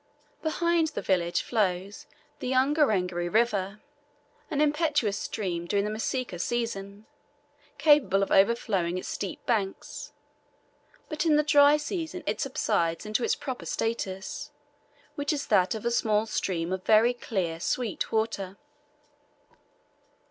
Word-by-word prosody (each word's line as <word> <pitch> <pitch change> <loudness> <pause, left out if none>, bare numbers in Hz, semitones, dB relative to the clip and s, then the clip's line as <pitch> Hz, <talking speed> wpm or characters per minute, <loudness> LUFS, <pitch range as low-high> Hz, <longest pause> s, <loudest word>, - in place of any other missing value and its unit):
Behind 335 0 +1
the 310 - -5
village 175 -2 +1
flows 200 -3 -1 0.3
the 255 - -2
Ungerengeri 215 - +2
River, 210 -3 +1 0.7
an 290 - -2
impetuous 295 -8 +2
stream 175 -5 -3
during 200 +2 +1
the 210 - -2
Masika 225 -3 -3
season, 210 -3 -3 0.7
capable 275 -10 +4
of - - -4
overflowing 195 -4 +2
its 185 - -5
steep 195 - -5
banks, 205 -5 -2 1.0
but 305 -2 -2
in 320 -3 +4
the 300 - +4
dry 290 0 +6
season 320 +2 -4
it - - -1
subsides 185 - 0
into 215 +3 -1
its - - +2
proper 260 -3 -6
status, 195 -4 -3 0.6
which 285 +1 -1
is 295 -2 -2
that 185 +3 +3
of 220 - -6
a 235 - +1
small 215 -2 +2
stream 180 -5 -2
of 190 - -3
very 225 +3 +5
clear 185 -9 -3
sweet 230 +4 -2
water. 210 -4 -1
220 Hz, 125 wpm, -27 LUFS, 190-280 Hz, 1.0 s, dry